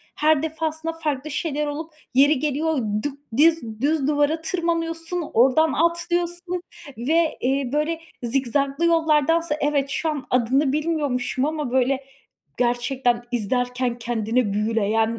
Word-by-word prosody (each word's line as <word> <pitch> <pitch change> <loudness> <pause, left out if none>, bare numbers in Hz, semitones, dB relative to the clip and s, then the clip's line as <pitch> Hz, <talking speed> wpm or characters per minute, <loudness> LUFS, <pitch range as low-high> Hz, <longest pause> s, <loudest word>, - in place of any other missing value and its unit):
her 305 -1 +3
defasında 320 0 -2
farklı 305 -3 -3
şeyler 300 0 -2
olup 310 +3 -5 0.2
yeri 280 +2 +5
geliyor 305 +2 0 0.3
dük 285 -1 -4 0.2
diz 280 -8 +2
düz 290 0 +1
duvara 295 +2 +1
tırmanıyorsun, 330 -1 -2
oradan 270 +7 +4
atlıyorsun 345 +1 0 0.4
ve, 315 +7 +1
eee, 265 0 0
böyle 305 +2 0 0.2
zikzaklı 275 +5 0
yollardansa 325 -1 +2
evet 285 -1 +1
şu 320 +3 -1
an 295 -3 -3
adını 260 +3 +2
bilmiyormuşum 285 -5 0
ama 300 -4 -2
böyle 260 +1 +1 0.5
gerçekten 245 0 +1
izlerken 245 +2 -1
kendini 230 -1 0
büyüleyen, 220 +1 +1
290 Hz, 120 wpm, -23 LUFS, 250-320 Hz, 0.5 s, yeri